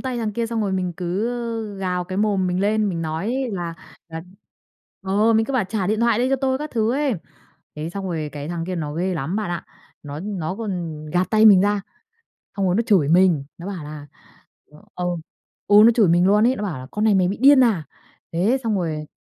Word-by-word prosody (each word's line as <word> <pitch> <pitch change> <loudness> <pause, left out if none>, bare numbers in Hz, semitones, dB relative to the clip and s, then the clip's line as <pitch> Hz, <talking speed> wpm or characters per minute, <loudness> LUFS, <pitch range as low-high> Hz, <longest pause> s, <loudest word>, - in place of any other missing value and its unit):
tay 255 -2 -3
thằng 220 -2 -2
kia, 230 +2 -2
xong 230 0 -2
rồi 200 -3 -1
mình 185 -2 -1
cứ, 180 +4 -2
ơ, 230 -3 -4
gào 180 -2 -2
cái 185 +1 -6
mồm 205 -3 +1
mình 180 0 -1
lên, 210 +1 +1
mình 170 -3 -3
nói 210 +12 -2
là 175 -3 -4 0.3
là 160 0 -7 0.8
ờ, 205 +4 +2
mình 220 0 +3
cứ 275 - -4
bảo 255 -6 +1
"trả 190 0 -2
điện 215 +3 0
thoại 235 -2 +3
đây 250 +2 +1
cho 270 - +3
tôi" 265 0 0
các 300 +1 -5
thứ 225 -1 0
ấy. 280 -2 0 0.6
Thế 155 +2 -4
xong 195 +2 -5
rồi 160 -4 -3
cái 145 0 -6
thằng 170 -1 -3
kia 185 - -3
nó 150 -3 -4
ghê 180 +3 -1
lắm 160 +4 -3
bạn 210 -4 -2
ạ. 175 - -4 0.4
Nó 145 0 -7
nó 185 -3 -4
còn 175 -8 -5
gạt 180 +1 0
tay 220 0 +4
mình 195 -4 +8
ra, 205 +1 +1 0.8
xong 195 - +1
rồi 180 -1 +2
nó 225 - +3
chửi 185 -10 +3
mình, 170 -3 +3
nó 175 +3 -8
bảo 185 -6 -5
là 150 -1 -9 0.6
ừ, 150 - -19 0.2
ừ, 180 - -4 0.6
ừ, 205 - +5
nó 230 - +8
chửi 220 -6 +4
mình 175 +2 +4
luôn 210 +2 +4
ấy, 255 +2 +2
nó - - -5
bảo 185 -10 -3
là 130 - -9
"Con 210 - -2
này 215 -2 +4
mày 185 -2 +3
bị 195 - -2
điên 275 +1 +7
à?" 210 -9 +1 0.5
Thế 200 +10 +2
xong 220 -2 +1
rồi 155 -4 -3
195 Hz, 235 wpm, -22 LUFS, 170-220 Hz, 0.8 s, mình